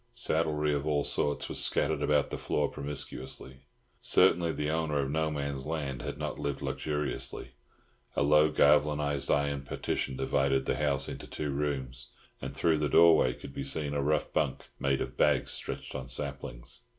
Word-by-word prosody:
Saddlery 75 -2 +1
of 70 +1 -2
all 75 -1 +1
sorts 75 0 0
was - - -1
scattered - - +1
about 75 -1 +2
the - - -3
floor 75 - 0
promiscuously. 70 -2 -4 0.4
Certainly 85 -2 +4
the 75 +1 -2
owner 80 -2 0
of 70 0 -2
No 80 +1 +1
Man's 70 -2 -3
Land 70 -5 -3
had - - -5
not - - -4
lived 70 -1 -3
luxuriously. 75 -2 -2 0.6
A - - +2
low 75 +2 +5
galvanised 75 -2 +2
iron 70 -1 +1
partition 65 -1 -3
divided 65 0 +1
the - - 0
house 70 -2 +1
into - - -7
two 75 -2 -4
rooms, 70 -3 -3 0.3
and - - -6
through 80 -2 +2
the 75 -1 0
doorway 80 -7 +6
could 70 - -10
be 70 - -4
seen 70 +2 -1
a 70 - 0
rough 75 +2 0
bunk 75 -4 -1
made 70 -1 +1
of - - -5
bags 75 -3 +3
stretched - - -4
on 65 - -5
saplings. - - -5
75 Hz, 170 wpm, -30 LUFS, 70-75 Hz, 0.6 s, doorway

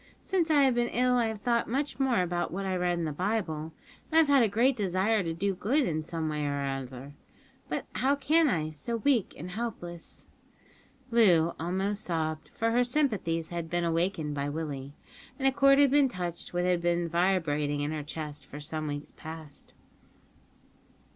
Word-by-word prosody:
Since 355 -4 0
I 295 -3 +5
have 265 -2 +4
been 240 0 +1
ill 250 +1 +2
I 240 -2 +3
have 220 -2 -5
thought 235 -1 +1
much 280 +5 -2
more 255 -8 +2
about 175 0 -2
what 195 +3 -3
I 190 -1 -1
read 180 -1 0
in 170 - -1
the 155 - -2
Bible, 165 -3 -2 0.4
and 320 - +5
I've 320 - +5
had 280 -2 +6
a 225 - +3
great 240 +6 +3
desire 200 +1 +1
to 165 -3 -2
do 195 +4 -1
good 250 +10 +1
in 155 -2 -1
some 160 0 -4
way 150 -1 -2
or 140 -1 -1
other, 135 0 -5 0.6
but - - -2
how 275 +2 +2
can 310 +2 +3
I 155 -6 -1
so 155 +10 -4
weak 240 -3 +1
and 175 +4 -7
helpless?" 180 -6 -6 0.8
Loo 175 -8 +5
almost 195 +5 -1
sobbed, 160 -2 -2
for 230 0 -1
her 245 +2 +3
sympathies 215 - 0
had 170 -2 -4
been 175 +1 0
awakened 165 -2 0
by 140 0 -2
Willie, 145 -2 -5 0.4
and 270 -1 +1
a - - +5
chord 275 +1 +5
had 285 -2 +5
been 285 -1 +5
touched 175 -6 -5
which 175 0 0
had 180 -1 +2
been 175 0 +1
vibrating 160 -5 +1
in 145 +1 -1
her 155 -1 -3
breast 150 -2 -6
for 145 - -8
some 155 +1 -4
weeks 145 0 -5
past. 160 -2 -9
175 Hz, 190 wpm, -29 LUFS, 155-235 Hz, 0.8 s, had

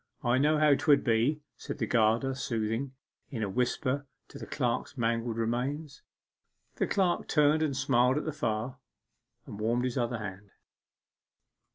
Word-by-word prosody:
I 120 +2 +2
knew 150 +2 +3
how 150 -1 +5
'twould 140 0 +3
be,' 125 +6 +1
said - - -6
the - - -1
gardener 115 +3 +2
soothingly, 115 0 -2 0.4
in 115 -6 -3
a 100 - -2
whisper 130 +5 -1 0.2
to - - -10
the - - -8
clerk's - - -2
mangled 115 0 -1
remains. 130 +6 -2 0.8
The - - +1
clerk 185 -3 +1
turned 150 0 +3
and 145 -4 0
smiled 130 -1 +3
at 150 - -2
the 155 - -2
fire, 115 0 -2 0.7
and 105 - -9
warmed 120 +3 +1
his 125 +1 -1
other 120 0 -1
hand. 100 -1 -7
125 Hz, 155 wpm, -30 LUFS, 115-145 Hz, 0.8 s, how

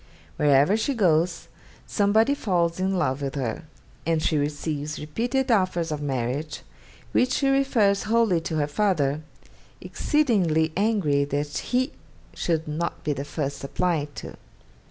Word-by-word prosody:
Wherever 145 +7 +4
she 275 +5 -1
goes, 170 -4 +1 0.4
somebody 220 +5 +3
falls 175 -9 0
in 190 +1 0
love 145 -4 0
with 135 0 -3
her, 125 -5 -3 0.4
and 165 -1 +1
she 155 - 0
receives 150 0 -2
repeated 240 - -1
offers 185 -6 +1
of 150 -1 -3
marriage, 140 +2 -3 0.5
which 250 - +2
she 275 - +1
refers 230 -8 +2
wholly 225 -7 +3
to 160 - -4
her 150 -2 +1
father, 150 -3 0 0.6
exceedingly 180 - +1
angry 195 -9 +2
that 145 +1 -3
he 255 +2 0 0.4
should 160 -2 -1
not 160 +3 -3
be 150 - 0
the 140 - -4
first 145 -2 -4
applied 150 0 -1
to. - - -8
165 Hz, 135 wpm, -25 LUFS, 145-205 Hz, 0.6 s, Wherever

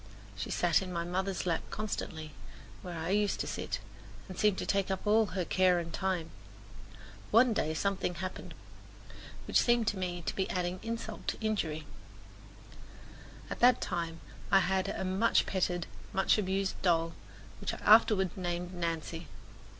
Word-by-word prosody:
She 95 - -5
sat 175 -1 +3
in 185 -1 -5
my 170 -1 -1
mother's 185 +2 -2
lap 170 -2 +1
constantly, 165 -7 -4 0.5
where 175 -2 -6
I 160 +2 -3
used 205 0 +1
to - - -2
sit, - - -3 0.5
and 185 - -8
seemed 210 0 +3
to - - -2
take 195 -1 +1
up 190 +1 -2
all 215 +1 +4
her 185 -3 -2
care 185 0 +3
and 170 -1 -4
time. 185 -3 -1 1.0
One 230 +2 +5
day 155 -6 0
something 195 0 -1
happened 185 +2 -6 0.9
which - - +4
seemed 240 -1 +3
to 205 - -4
me 175 -1 -3
to - - -3
be 190 - -1
adding 180 0 -1
insult 230 -1 -5
to - - -1
injury. 165 -9 -1 1.6
At - - -5
that 245 0 +6
time 170 -3 -3 0.3
I 195 - +6
had 190 +1 +1
a - - -3
much 190 +5 +3
petted, 175 -2 0 0.3
much 190 +2 +3
abused 195 0 -1
doll, 165 -2 +2 0.5
which - - -2
I - - -6
afterward 210 -4 +6
named 175 -1 -3
Nancy. 165 -1 -3
185 Hz, 160 wpm, -32 LUFS, 170-200 Hz, 1.6 s, that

